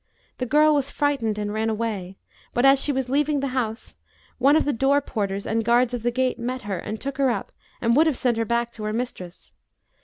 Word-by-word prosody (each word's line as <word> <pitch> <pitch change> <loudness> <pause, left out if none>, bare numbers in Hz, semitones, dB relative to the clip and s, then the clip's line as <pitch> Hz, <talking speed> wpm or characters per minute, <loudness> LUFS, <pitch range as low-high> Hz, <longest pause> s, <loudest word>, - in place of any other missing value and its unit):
The 255 - -2
girl 300 +4 +5
was 280 -2 0
frightened 275 -9 0
and 205 0 -3
ran 220 +1 0
away; 210 -4 -3 0.4
but, 245 - +3
as 270 0 +6
she 295 - 0
was 265 -2 -1
leaving 290 +2 +1
the 275 0 -2
house, 230 -3 -3 0.4
one 275 +3 +5
of 315 - +3
the 290 - +1
door 270 +4 +3
porters 200 -7 -3
and 225 +1 0
guards 240 +2 +3
of 245 - -3
the 240 - +1
gate 255 +1 -1
met 250 +2 -4
her 195 -4 -3
and 215 +5 -5
took 275 0 -5
her 270 -1 +3
up 215 -5 -3 0.3
and 235 0 +2
would 315 +3 +5
have 295 -6 0
sent 240 -3 +1
her 225 - 0
back 235 +1 0
to 220 - -9
her 215 - -2
mistress. 215 -7 -6
240 Hz, 235 wpm, -24 LUFS, 220-275 Hz, 0.4 s, as